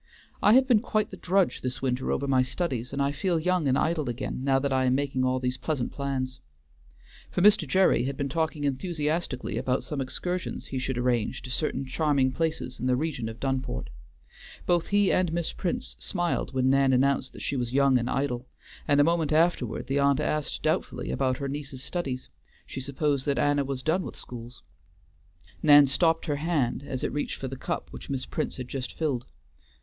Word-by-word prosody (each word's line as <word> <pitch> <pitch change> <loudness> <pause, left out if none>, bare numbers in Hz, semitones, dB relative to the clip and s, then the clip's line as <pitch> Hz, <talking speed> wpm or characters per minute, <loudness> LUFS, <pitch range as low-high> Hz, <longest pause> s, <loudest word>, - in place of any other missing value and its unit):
"I 210 - +6
have 260 +1 +6
been 240 -5 +5
quite 215 -2 -1
the - - -6
drudge 190 0 +1
this 125 0 -3
winter 130 0 0
over 140 - -1
my 130 -2 +4
studies, 130 -3 -2
and 140 - -4
I 140 - +1
feel 170 +4 0
young 180 -2 +1
and 135 0 +3
idle 160 -5 0
again, 125 +1 -4
now 135 -1 +3
that 135 0 0
I 130 0 +2
am 130 0 +3
making 135 -2 0
all 130 0 +1
these 125 0 -2
pleasant 145 -6 -2
plans." 130 -2 -3 0.9
For 180 - 0
Mr. 205 -6 +6
Gerry 185 -3 +3
had 135 0 -3
been 140 - -1
talking 160 +1 -1
enthusiastically 150 - -1
about 130 +1 0
some 150 -3 -3
excursions 180 +7 -3
he 130 - -4
should 130 0 -2
arrange 125 0 0
to 125 - -7
certain 135 -1 -1
charming 140 -1 +1
places 155 -4 -2
in 125 - -1
the 125 - +3
region 130 -5 -2
of 115 +1 -9
Dunport. 130 - -2 0.7
Both 175 -2 +2
he 205 -1 +3
and 180 -3 +2
Miss 170 0 -1
Prince 175 - -2
smiled 175 -1 -1
when 130 0 +2
Nan 135 -1 +4
announced 135 +1 +2
that - - -9
she - - -1
was 120 -2 -2
young 135 -1 +4
and 120 +1 -2
idle, 130 -2 -1 0.4
and 145 -1 +4
a - - +7
moment 165 -1 +1
afterward 155 -7 +1
the 140 +1 0
aunt 140 0 +3
asked 150 -1 -1
doubtfully - - -1
about 130 - 0
her 140 - -3
niece's 135 -2 -5
studies; 135 -8 -3 0.4
she - - -6
supposed 140 +1 -1
that 140 - +1
Anna 145 -1 +2
was 135 -1 -4
done 165 +6 +2
with - - -7
schools. 120 0 -9 1.0
Nan 145 -1 +8
stopped 160 +4 +2
her 145 -3 -1
hand 145 -6 0
as 130 -1 -4
it - - -1
reached 145 - -2
for 135 - -4
the 135 - -5
cup 130 - -4
which - - -10
Miss 135 -2 -2
Prince - - -3
had 125 -2 -5
just 130 -1 -5
filled. 140 -7 -2
140 Hz, 200 wpm, -27 LUFS, 130-160 Hz, 1.0 s, Nan